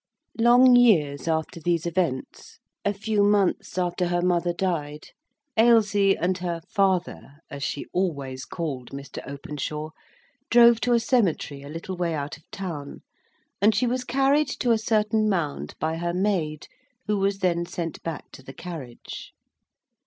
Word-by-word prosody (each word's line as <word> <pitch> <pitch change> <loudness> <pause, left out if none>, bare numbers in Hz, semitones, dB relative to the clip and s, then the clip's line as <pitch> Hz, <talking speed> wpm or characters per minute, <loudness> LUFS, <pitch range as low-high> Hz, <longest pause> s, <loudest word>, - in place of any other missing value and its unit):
Long 245 +2 +7
years 165 - +4
after 160 +1 -1
these 170 0 0
events,—a 170 +3 -3
few 210 +1 -1
months 200 -3 +2
after 180 0 0
her 175 0 0
mother 175 -1 +2
died, 160 -5 -3 0.5
Ailsie 210 -4 +4
and 180 +2 0
her 170 -2 -3
"father" 190 -7 0 0.2
(as 140 - -7
she 140 - -3
always 140 -8 -2
called 140 -8 -5
Mr. 140 0 -8
Openshaw) 150 +2 -5 0.6
drove 235 -1 +6
to 245 - +2
a 235 - +4
cemetery 195 - 0
a 140 - -10
little 165 +4 -6
way 170 -2 -1
out 145 -1 -4
of 155 - -22
town, 165 -7 -6 0.6
and 210 +1 +5
she 225 - +2
was 250 +1 -1
carried 275 +4 +2
to 245 - -1
a 230 - +4
certain 215 -1 +1
mound 170 -8 -2
by 160 +1 -1
her 170 +1 -2
maid, 180 -6 -1 0.4
who 210 -1 0
was 195 0 +1
then 175 -3 0
sent 165 -2 -5
back 165 -3 -6
to - - -12
the 135 +1 -11
carriage. 140 -7 -8
175 Hz, 150 wpm, -25 LUFS, 155-210 Hz, 0.6 s, Long